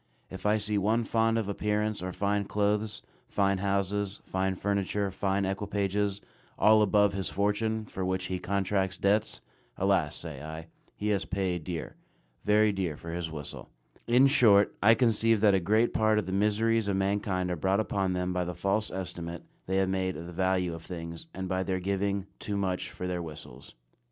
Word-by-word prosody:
If 95 +2 -4
I 105 +1 +4
see 105 0 -1
one 110 +4 +2
fond 115 0 +2
of 110 -3 -1
appearance 105 +1 -1
or 90 0 -3
fine 100 +2 0
clothes, 105 +1 0 0.2
fine 100 -1 +1
houses, 100 +1 -1
fine 95 0 -1
furniture, 100 +1 -1
fine 95 +1 0
equipages, 100 0 -1 0.4
all 110 0 +6
above 105 -1 +4
his 95 -1 -2
fortune, 110 +2 0
for 95 - -5
which 95 0 -1
he 90 0 -3
contracts 95 0 0
debts, 105 +2 +1 0.4
"Alas," - - +1
say 75 -5 -7
I, 80 +1 -7 0.3
"he 105 - -2
has 100 -2 +1
paid 95 -3 -2
dear, 85 -4 -5 0.5
very 105 0 +4
dear 90 -6 -2
for 85 - -7
his 85 -1 -3
whistle." 75 -3 -8 0.4
In 125 +3 +6
short, 110 -8 +5
I 115 +3 +7
conceive 115 -1 +3
that 105 -2 +5
a 95 - +4
great 110 +6 +2
part 110 0 +3
of 105 - 0
the 95 - -4
miseries 105 +2 +2
of 100 - +1
mankind 95 -2 0
are - - 0
brought 95 +5 +1
upon 100 -3 0
them 90 0 -1
by 90 0 0
the 90 0 -4
false 100 +4 0
estimate 85 -2 -5 0.2
they 95 +1 0
have 95 -1 +2
made 95 -2 -1
of 80 - -7
the 85 - -8
value 95 -1 +1
of 85 - -7
things, 85 - -7
and 95 0 -5
by 95 0 0
their 95 0 -1
giving 100 +1 -1
"too 100 -1 -3
much 95 -2 -1
for 90 - -6
their 90 -1 -2
whistles." 75 -5 -10
100 Hz, 185 wpm, -29 LUFS, 90-105 Hz, 0.5 s, I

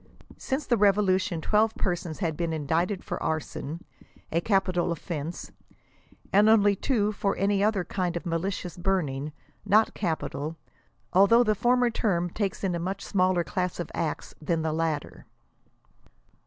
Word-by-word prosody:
Since 270 +2 -2
the 240 - +2
revolution 195 -4 +2
twelve 215 +5 +2
persons 175 -3 -2
had 165 -5 -1
been 170 0 -2
indicted 165 +6 -1
for - - -5
arson, 155 0 -3 0.5
a 170 - +1
capital 185 -3 +1
offense, 165 -1 -5 0.8
and 205 +2 +6
only 205 -2 +5
two 210 -1 +1
for 200 -1 -1
any 200 0 +2
other 210 -3 +2
kind 175 -2 -2
of 170 - -7
malicious 180 +1 -3
burning, 155 -6 -1 0.3
not 210 +2 +3
capital; 160 -3 -3 0.6
although 200 +6 +6
the 215 -2 +2
former 245 +3 +2
term 175 -6 0
takes 200 -1 -3
in 190 -2 0
a 170 - -2
much 190 +3 -4
smaller 185 -3 +2
class 180 +5 -2
of 175 - -4
acts 155 -2 -3
than 160 +1 0
the 160 -1 0
latter. 160 -2 -3
185 Hz, 145 wpm, -27 LUFS, 165-205 Hz, 0.8 s, and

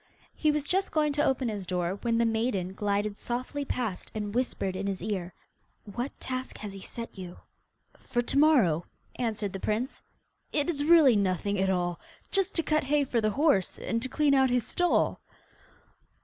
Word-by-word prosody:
He 310 - +1
was 295 -1 -2
just 385 +1 +1
going 300 -2 +2
to 295 +1 +1
open 265 -4 +1
his 205 -4 -4
door, 180 +1 -1
when 230 -1 +1
the 235 - +3
maiden 220 -5 0
glided 205 +1 -1
softly 255 +6 -3
past 235 -8 -3
and 205 -1 -3
whispered 230 -6 -1
in 195 +1 -3
his 195 -1 -2
ear: 190 -4 -3 0.5
'What 240 +6 -5
task 255 0 -4
has 210 -2 -7
he 195 - -8
set 230 0 -8
you?' 180 -1 -8 0.6
'For 240 -1 -2
to 275 - +2
morrow,' 225 - +4 0.3
answered 220 -4 -2
the 195 - -4
prince, 220 +7 -2 0.5
'it 290 -2 +1
is 290 -3 -1
really 310 -7 +7
nothing 200 0 0
at 190 0 +2
all! 175 -2 0 0.3
Just 390 -1 +1
to 330 - +2
cut 305 0 +1
hay 290 +1 +3
for 245 -4 0
the 215 - +2
horse, 265 - +2
and 230 - -2
to 260 - -2
clean 295 0 +2
out 265 -1 +4
his 245 -2 +1
stall! 355 +6 +1
230 Hz, 185 wpm, -28 LUFS, 200-280 Hz, 0.6 s, really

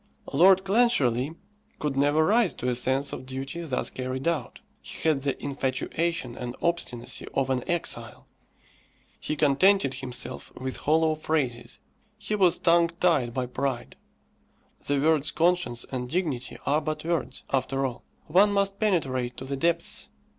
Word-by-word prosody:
Lord 185 +6 +6
Clancharlie 165 - +2 0.4
could 150 -2 -2
never 145 +3 +3
rise 220 0 +3
to 125 - -4
a 125 - +2
sense 130 +3 +1
of 130 - -7
duty 135 +5 -5
thus 155 -6 -1
carried 130 +2 -4
out. 160 -8 -2 0.2
He - - -5
had 150 -4 +2
the 140 -1 -2
infatuation 140 +1 -1
and 125 0 -6
obstinacy 130 -8 -1
of 135 -1 +1
an 125 -2 0
exile. 175 -1 -1 0.9
He 155 - -3
contented 150 +2 +3
himself 125 -2 -6
with 130 0 -4
hollow 160 +1 +2
phrases. 150 -6 -2 0.4
He 215 0 -4
was 190 -5 +4
tongue 170 0 +4
tied 160 -10 +2
by 130 -1 0
pride. 125 0 -3 0.9
The 145 -1 +2
words 155 0 +3
conscience 170 -7 +1
and 125 -2 -3
dignity 150 -7 -2
are 150 +2 +2
but 155 0 -4
words, 170 -1 -2
after 135 0 0
all. 125 -2 -5 0.2
One 195 +6 +4
must 200 0 +1
penetrate 130 - 0
to 130 - -6
the 140 +1 -3
depths. 170 +4 0
145 Hz, 145 wpm, -26 LUFS, 130-170 Hz, 0.9 s, Lord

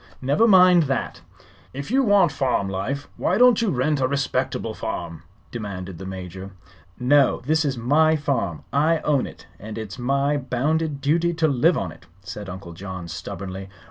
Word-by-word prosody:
"Never 145 - +2
mind 180 -4 +6
that." 135 - -2 0.5
"If 140 +9 -6
you 270 +2 +4
want 200 - +4
farm 130 -8 0
life, 120 +10 -3
why 185 - +1
don't 245 -2 +5
you 225 - +1
rent 145 +1 0
a 130 - +3
respectable 140 +1 -1
farm?" 85 -2 -5 0.3
demanded 95 -6 -6
the 95 - -7
Major. 95 0 -8 0.5
"No; 135 +2 +3
this 155 +3 +2
is 135 -4 -1
my 155 +7 +3
farm. 125 - -2
I 155 +3 +2
own 145 -4 +1
it, - - -13
and 110 +2 -8
it's 110 +1 -7
my 140 +3 +1
bounded 145 +3 -1
duty 170 +4 +1
to 165 -1 +2
live 155 +5 +3
on - - -3
it," 90 - -16 0.2
said 100 0 -7
Uncle 90 -1 -8
John, 95 0 -7
stubbornly. 95 +3 -7
135 Hz, 170 wpm, -23 LUFS, 95-155 Hz, 0.5 s, mind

